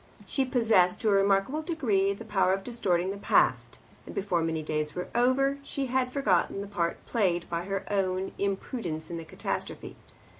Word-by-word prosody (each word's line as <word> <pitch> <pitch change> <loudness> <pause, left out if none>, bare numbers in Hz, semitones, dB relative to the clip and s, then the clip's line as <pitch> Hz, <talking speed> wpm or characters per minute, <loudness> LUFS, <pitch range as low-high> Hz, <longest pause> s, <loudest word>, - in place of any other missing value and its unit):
She 270 - 0
possessed 225 -8 +3
to 220 - +2
a - - +4
remarkable 195 +8 +2
degree 235 - +1
the 200 - -10
power 190 -3 +2
of 195 0 -2
distorting 190 -6 0
the 200 - -5
past, - - +2 0.3
and - - -8
before 185 -4 0
many 160 -1 -1
days 150 -1 -2
were 180 - -4
over 270 +3 +2
she 280 -1 -3
had 255 0 0
forgotten 200 -7 +1
the 200 - -6
part 170 -4 -1
played 180 -7 0
by 170 +1 -2
her 195 0 -2
own 190 -1 0
imprudence 190 -5 -3
in 170 - -3
the 165 - -7
catastrophe. - - -5
195 Hz, 180 wpm, -28 LUFS, 180-240 Hz, 0.3 s, a